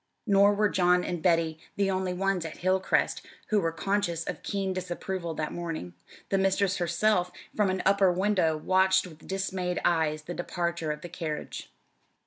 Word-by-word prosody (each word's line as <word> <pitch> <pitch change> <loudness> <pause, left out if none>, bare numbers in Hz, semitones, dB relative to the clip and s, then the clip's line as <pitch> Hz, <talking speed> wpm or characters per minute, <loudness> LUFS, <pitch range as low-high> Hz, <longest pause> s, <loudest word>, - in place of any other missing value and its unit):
Nor 200 -1 +5
were 210 +1 +3
John 180 -2 +3
and 175 -2 -3
Betty 165 -2 +2 0.2
the 200 -1 +1
only 185 -1 -1
ones 190 -1 0
at 165 -1 -7
Hilcrest 185 +1 +1 0.3
who 215 - +3
were 165 - 0
conscious 175 -1 -1
of - - -5
keen 195 -2 -2
disapproval 180 -1 -4
that 155 -1 -3
morning. 165 - -5 0.4
The 195 - +2
mistress 195 0 +2
herself, 180 +1 +1 0.2
from 210 -2 +2
an 185 0 -1
upper 195 -1 +4
window, 185 -4 +2
watched 190 +4 +3
with 160 -3 -13
dismayed 190 -2 -2
eyes 155 -2 +1
the 175 - -6
departure 170 -2 -2
of 150 0 -5
the 175 - -8
carriage. 160 -3 -5
180 Hz, 165 wpm, -28 LUFS, 165-195 Hz, 0.4 s, Nor